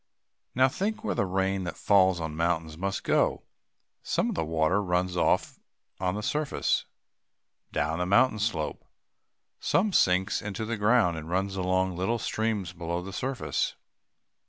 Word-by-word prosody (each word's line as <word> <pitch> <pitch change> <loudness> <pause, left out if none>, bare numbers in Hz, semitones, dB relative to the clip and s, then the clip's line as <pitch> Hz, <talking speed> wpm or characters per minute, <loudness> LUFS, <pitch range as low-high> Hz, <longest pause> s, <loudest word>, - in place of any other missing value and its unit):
Now 130 +1 +5
think 215 - -2
where - - 0
the 100 - 0
rain 95 +1 0
that 85 - -5
falls 95 -3 +4
on 80 -2 -4
mountains 80 -1 -1
must 95 +3 -3
go. - - +1 0.6
Some - - 0
of - - -2
the 80 - -1
water 80 +4 +1
runs 90 -1 0
off 85 - +1 0.4
on 90 0 0
the 105 - -4
surface, 150 +5 0 0.8
down 80 +3 -1
the 90 - 0
mountain 110 +3 +4
slope. 100 -8 -2 0.8
Some 205 +1 +1
sinks 95 - +3
into 105 +1 -4
the 115 +1 -2
ground, 105 -5 +3
and 80 +1 -7
runs 95 +2 -1
along 95 0 +1
in 85 - -8
little 110 +6 0
streams 110 -6 -2
below 85 0 -3
the 95 +1 -8
surface. 130 +4 -2
95 Hz, 155 wpm, -28 LUFS, 85-110 Hz, 0.8 s, Now